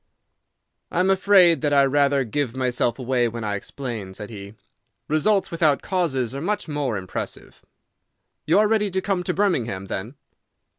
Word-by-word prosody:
"I -, -, -2 dB
am 185 Hz, +1 st, +3 dB
afraid 185 Hz, -5 st, +5 dB
that 145 Hz, -1 st, +1 dB
I 140 Hz, -1 st, +5 dB
rather 140 Hz, 0 st, +2 dB
give 130 Hz, +1 st, -2 dB
myself 125 Hz, -2 st, 0 dB
away 125 Hz, -2 st, 0 dB
when 115 Hz, 0 st, -5 dB
I 105 Hz, -1 st, -2 dB
explain," 105 Hz, -3 st, -6 dB
said 105 Hz, +2 st, -8 dB
he. 100 Hz, 0 st, -9 dB, 0.5 s
"Results 190 Hz, +7 st, +1 dB
without 155 Hz, -4 st, +2 dB
causes 135 Hz, -, -1 dB
are 140 Hz, -, -5 dB
much 205 Hz, +4 st, -2 dB
more 145 Hz, -7 st, -2 dB
impressive. 95 Hz, -1 st, -7 dB, 0.9 s
You 160 Hz, -, +4 dB
are 210 Hz, +1 st, +5 dB
ready 210 Hz, -1 st, +1 dB
to 190 Hz, 0 st, -1 dB
come 190 Hz, -1 st, -1 dB
to 180 Hz, 0 st, -2 dB
Birmingham, 120 Hz, -, 0 dB
then?" 100 Hz, +7 st, -5 dB
140 Hz, 160 wpm, -23 LUFS, 120-180 Hz, 0.9 s, afraid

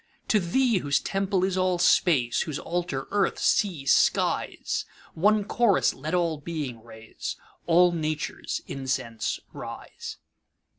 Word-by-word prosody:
To 215 Hz, -, +4 dB
Thee, 220 Hz, +4 st, +2 dB
whose 145 Hz, -3 st, +1 dB
temple 195 Hz, -1 st, 0 dB
is 190 Hz, -1 st, +1 dB
all 185 Hz, -1 st, +2 dB
Space, 155 Hz, -8 st, +3 dB
Whose 155 Hz, -3 st, -3 dB
altar 170 Hz, -6 st, -3 dB
earth, 200 Hz, -1 st, +1 dB
sea, 175 Hz, -10 st, +1 dB
skies, -, -, +1 dB, 0.3 s
One 210 Hz, +5 st, +3 dB
chorus 210 Hz, -1 st, +2 dB
let 155 Hz, +6 st, -3 dB
all 170 Hz, -4 st, 0 dB
Being 145 Hz, -8 st, -5 dB
raise, 110 Hz, -1 st, -7 dB, 0.3 s
All 175 Hz, +1 st, +5 dB
Nature's 155 Hz, -2 st, -3 dB
incense 130 Hz, -4 st, -3 dB
rise! -, -, -8 dB
170 Hz, 120 wpm, -26 LUFS, 140-190 Hz, 0.3 s, All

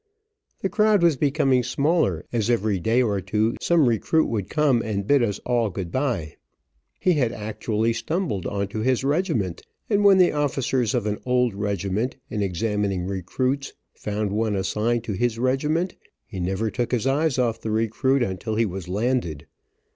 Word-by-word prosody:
The -, -, 0 dB
crowd 215 Hz, -4 st, +3 dB
was 170 Hz, -3 st, +5 dB
becoming 135 Hz, -2 st, +2 dB
smaller, 130 Hz, -, 0 dB
as 115 Hz, -1 st, 0 dB
every 110 Hz, -4 st, +1 dB
day 115 Hz, +7 st, +2 dB
or 100 Hz, -4 st, 0 dB
two 110 Hz, +4 st, 0 dB
some 165 Hz, -6 st, +3 dB
recruit 120 Hz, +8 st, +2 dB
would 105 Hz, -5 st, -2 dB
come 145 Hz, -6 st, +2 dB
and 100 Hz, -3 st, -3 dB
bid 140 Hz, +3 st, +4 dB
us 105 Hz, -4 st, 0 dB
all 120 Hz, -3 st, +1 dB
good 90 Hz, -2 st, -5 dB
bye. 120 Hz, -, -2 dB, 0.6 s
He 180 Hz, -, +3 dB
had 130 Hz, -7 st, +1 dB
actually 110 Hz, +1 st, -1 dB
stumbled 115 Hz, -, -2 dB
on 100 Hz, -1 st, -2 dB
to 110 Hz, -, -4 dB
his 130 Hz, +3 st, +1 dB
regiment, 140 Hz, -, 0 dB, 0.3 s
and 205 Hz, 0 st, +3 dB
when 200 Hz, -1 st, +7 dB
the 180 Hz, -2 st, +5 dB
officers 135 Hz, -5 st, 0 dB
of 120 Hz, -4 st, 0 dB
an 105 Hz, -1 st, -2 dB
old 125 Hz, -2 st, +1 dB
regiment, 100 Hz, +3 st, -2 dB, 0.2 s
in 105 Hz, -, -2 dB
examining 100 Hz, -1 st, -1 dB
recruits, 125 Hz, +9 st, -2 dB, 0.2 s
found 105 Hz, -1 st, -3 dB
one 110 Hz, 0 st, 0 dB
assigned 110 Hz, +4 st, 0 dB
to 110 Hz, -, -3 dB
his 115 Hz, +3 st, 0 dB
regiment, 150 Hz, +8 st, 0 dB, 0.3 s
he 95 Hz, -, -8 dB
never 95 Hz, +5 st, -1 dB
took 120 Hz, -2 st, -2 dB
his 125 Hz, -2 st, 0 dB
eyes 140 Hz, +1 st, +1 dB
off 120 Hz, -3 st, 0 dB
the 110 Hz, -, -4 dB
recruit 115 Hz, +5 st, +1 dB
until 95 Hz, +1 st, -3 dB
he 115 Hz, +1 st, +2 dB
was 95 Hz, -2 st, -5 dB
landed. 105 Hz, -, -1 dB
115 Hz, 170 wpm, -24 LUFS, 105-135 Hz, 0.6 s, when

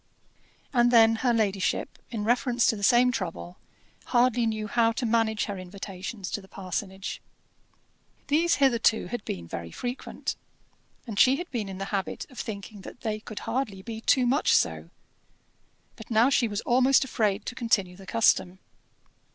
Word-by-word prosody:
And 240 Hz, -1 st, +4 dB
then 225 Hz, -2 st, +6 dB
her 245 Hz, +1 st, +1 dB
ladyship, 200 Hz, -5 st, 0 dB
in 220 Hz, -3 st, -4 dB
reference 240 Hz, +1 st, +2 dB
to -, -, +3 dB
the 205 Hz, -, -8 dB
same 245 Hz, +4 st, +5 dB
trouble, 180 Hz, -4 st, -5 dB, 0.5 s
hardly 245 Hz, -1 st, +2 dB
knew 215 Hz, -1 st, -2 dB
how 225 Hz, +2 st, +2 dB
to 240 Hz, -, -3 dB
manage 225 Hz, -1 st, +1 dB
her 200 Hz, -3 st, -5 dB
invitations 190 Hz, +1 st, -7 dB
to 205 Hz, -, -3 dB
the 190 Hz, -, -16 dB
parsonage. 190 Hz, +1 st, -5 dB, 1.0 s
These 330 Hz, +4 st, +2 dB
hitherto 235 Hz, -5 st, +2 dB
had 240 Hz, -4 st, -4 dB
been 85 Hz, -2 st, -5 dB
very 85 Hz, 0 st, -6 dB
frequent, 245 Hz, -, -5 dB, 0.7 s
and 215 Hz, -4 st, -4 dB
she 260 Hz, +1 st, +6 dB
had 350 Hz, +5 st, -6 dB
been 220 Hz, -6 st, -3 dB
in 190 Hz, -, -7 dB
the 195 Hz, -, -4 dB
habit 195 Hz, -1 st, -2 dB
of 255 Hz, -, -10 dB
thinking 205 Hz, -1 st, -6 dB
that 215 Hz, -, -11 dB
they 215 Hz, -2 st, -2 dB
could 215 Hz, 0 st, -8 dB
hardly 215 Hz, -7 st, -3 dB
be 225 Hz, 0 st, -6 dB
too 255 Hz, +1 st, +3 dB
much 265 Hz, +5 st, +3 dB
so; 80 Hz, 0 st, 0 dB, 1.1 s
but 220 Hz, -, -12 dB
now 235 Hz, +4 st, +4 dB
she 245 Hz, -3 st, +3 dB
was 205 Hz, -1 st, -3 dB
almost 260 Hz, +3 st, +4 dB
afraid 215 Hz, -5 st, -1 dB
to -, -, -4 dB
continue 215 Hz, -7 st, 0 dB
the 190 Hz, 0 st, -14 dB
custom. 190 Hz, -5 st, +2 dB
225 Hz, 165 wpm, -27 LUFS, 195-245 Hz, 1.1 s, then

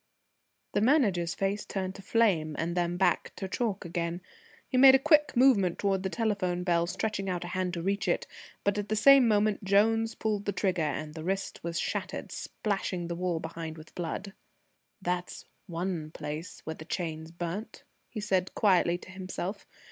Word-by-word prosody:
The 205 Hz, -, +2 dB
Manager's 205 Hz, -, +3 dB
face 195 Hz, +1 st, -1 dB
turned 190 Hz, -1 st, -3 dB
to 195 Hz, -, -10 dB
flame, 190 Hz, -8 st, +2 dB
and 170 Hz, +2 st, -2 dB
then 175 Hz, 0 st, 0 dB
back 180 Hz, -2 st, +1 dB
to 190 Hz, -, -4 dB
chalk 210 Hz, -2 st, -2 dB
again. 170 Hz, +1 st, -3 dB, 0.5 s
He -, -, -4 dB
made 265 Hz, +1 st, +9 dB
a -, -, +8 dB
quick 295 Hz, 0 st, +3 dB
movement 215 Hz, -9 st, +5 dB
towards 195 Hz, -2 st, +1 dB
the 190 Hz, -, -2 dB
telephone 190 Hz, -5 st, -1 dB
bell, 170 Hz, -1 st, +2 dB
stretching 195 Hz, +1 st, -2 dB
out 180 Hz, -1 st, -2 dB
a 175 Hz, -, -6 dB
hand 185 Hz, 0 st, -1 dB
to 170 Hz, -, -4 dB
reach 195 Hz, 0 st, 0 dB
it, 175 Hz, -, +1 dB, 0.4 s
but 200 Hz, +1 st, +1 dB
at 205 Hz, -, -4 dB
the 215 Hz, -, +1 dB
same 270 Hz, +3 st, +7 dB
moment 210 Hz, -1 st, +2 dB
Jones 225 Hz, +3 st, +3 dB
pulled 210 Hz, -2 st, -1 dB
the 200 Hz, -, -1 dB
trigger 180 Hz, -2 st, 0 dB
and 155 Hz, 0 st, -2 dB
the 160 Hz, -1 st, -7 dB
wrist 195 Hz, +2 st, -3 dB
was 170 Hz, 0 st, -2 dB
shattered, -, -, -3 dB
splashing 185 Hz, -4 st, -3 dB
the 170 Hz, -, -2 dB
wall 175 Hz, -1 st, -1 dB
behind 160 Hz, 0 st, -6 dB
with 155 Hz, 0 st, -13 dB
blood. 185 Hz, +3 st, -4 dB, 0.7 s
"That's 180 Hz, 0 st, -3 dB, 0.2 s
one 170 Hz, -2 st, -3 dB
place 155 Hz, +2 st, -6 dB
where 160 Hz, -, -4 dB
the 155 Hz, -, -10 dB
chains 160 Hz, -3 st, -4 dB
burnt," 175 Hz, +6 st, -5 dB, 0.3 s
he 215 Hz, -, -5 dB
said 190 Hz, -3 st, 0 dB
quietly 180 Hz, -4 st, +3 dB
to 185 Hz, -, -13 dB
himself. 190 Hz, +1 st, -5 dB
185 Hz, 180 wpm, -29 LUFS, 170-205 Hz, 0.7 s, made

